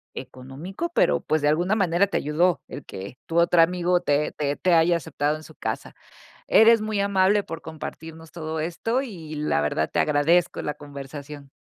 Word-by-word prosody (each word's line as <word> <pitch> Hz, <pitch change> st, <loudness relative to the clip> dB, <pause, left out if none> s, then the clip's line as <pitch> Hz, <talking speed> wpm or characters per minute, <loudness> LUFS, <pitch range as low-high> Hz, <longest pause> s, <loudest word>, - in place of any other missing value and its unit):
económico, 150 Hz, -, -6 dB
pero, -, -, +3 dB
pues, 155 Hz, 0 st, 0 dB
de 145 Hz, -, +2 dB
alguna 175 Hz, +7 st, +2 dB
manera 190 Hz, -1 st, +2 dB
te 200 Hz, -, -1 dB
ayudó 170 Hz, +4 st, +1 dB
el -, -, -8 dB
que 100 Hz, +6 st, -8 dB
tu 165 Hz, -, -2 dB
otro 170 Hz, 0 st, +5 dB
amigo 180 Hz, +1 st, +2 dB
te 145 Hz, -3 st, +1 dB
te 145 Hz, -1 st, -2 dB
te 180 Hz, +3 st, +1 dB
haya 170 Hz, +1 st, +4 dB
aceptado 150 Hz, -1 st, -2 dB
en 155 Hz, -, -10 dB
su -, -, -13 dB
casa. -, -, -5 dB, 0.5 s
Eres 225 Hz, 0 st, +6 dB
muy 215 Hz, -1 st, -1 dB
amable 200 Hz, +1 st, +3 dB
por 165 Hz, -, -7 dB
compartirnos 160 Hz, 0 st, -9 dB
todo 160 Hz, -1 st, -4 dB
esto 175 Hz, +10 st, -1 dB
y, 170 Hz, -, -8 dB
la 150 Hz, -, 0 dB
verdad, 75 Hz, +1 st, -1 dB
te -, -, +1 dB
agradezco 160 Hz, +4 st, +2 dB
la 150 Hz, -, -3 dB
conversación. 140 Hz, 0 st, -9 dB
165 Hz, 180 wpm, -24 LUFS, 150-180 Hz, 0.5 s, Eres